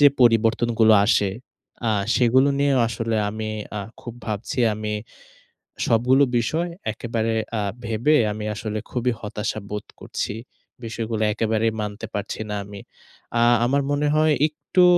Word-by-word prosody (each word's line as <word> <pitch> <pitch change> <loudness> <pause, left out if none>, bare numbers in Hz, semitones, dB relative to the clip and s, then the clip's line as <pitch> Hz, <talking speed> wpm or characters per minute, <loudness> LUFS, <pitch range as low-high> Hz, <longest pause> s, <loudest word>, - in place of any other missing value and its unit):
যে 145 - +9 0.2
পরিবর্তনগুলো 115 -1 +4
আসে, 100 -3 +3 0.6
আ - - +3 0.2
সেগুলো 130 +3 +4
নিয়েও 140 -2 +3
আসলে 115 0 -2
আমি 110 +1 -4 0.3
আ - - -2 0.2
খুব 120 -1 -8
ভাবছি, 110 +4 -4 0.2
আমি 105 0 -3 0.9
সবগুলো 125 +5 +4
বিষয় 160 +9 0 0.2
একেবারে 115 0 -2 0.3
আ - - 0 0.2
ভেবে 115 +7 +2 0.2
আমি 105 0 -5
আসলে 110 0 -3
খুবই 125 0 0
হতাশা 105 0 -3
বোধ 105 -1 -4
করছি। - - -4 0.5
বিষয়গুলা 115 -1 -2
একেবারেই 110 0 +1
মানতে 105 +1 -5
পারছি 100 +2 -4
না 105 - -2
আমি। 100 -1 -9 0.6
আ - - +6 0.2
আমার 140 +3 +2
মনে 145 +1 +1
হয় 155 0 +4
একটু 155 +4 +1
115 Hz, 135 wpm, -23 LUFS, 110-125 Hz, 0.9 s, যে